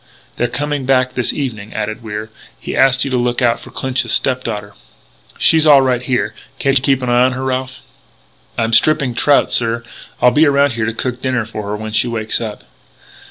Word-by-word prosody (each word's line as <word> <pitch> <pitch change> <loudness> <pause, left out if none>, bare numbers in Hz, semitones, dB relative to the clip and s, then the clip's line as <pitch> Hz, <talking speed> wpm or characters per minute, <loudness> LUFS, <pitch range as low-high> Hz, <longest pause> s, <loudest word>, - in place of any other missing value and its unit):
"They're 120 - +1
coming 145 +1 -3
back 130 -1 +2
this 125 - 0
evening," 110 -7 -5
added 110 +2 -3
Wier. 110 0 -6 0.3
"He - - -5
asked 135 0 +3
you 135 - -4
to 130 - +1
look 120 0 0
out 120 -2 +2
for - - -13
Clinch's 130 -1 -2
step 130 -1 +2
daughter." 105 -2 -5 0.6
"She's 160 -1 +4
all 140 -3 +7
right 125 -2 +1
here. 125 -1 -1 0.2
Can't 135 -1 +1
you 130 - +4
keep 135 -1 +1
an 125 - -2
eye 120 0 +4
on 130 0 +2
her, 130 +1 -5
Ralph?" 130 0 -3 0.8
"I'm 115 0 0
stripping 150 -2 +3
trout, 145 +4 +2
sir. 115 0 0 0.4
I'll 125 - +5
be 155 +3 +4
around 140 0 +3
here 115 -2 -2
to 115 - -2
cook 125 +1 -3
dinner 130 -3 -1
for 105 -1 -7
her 105 - -2
when 110 +1 -6
she 110 - +2
wakes 110 -2 -2
up." 110 -2 -6
125 Hz, 205 wpm, -16 LUFS, 115-135 Hz, 0.8 s, all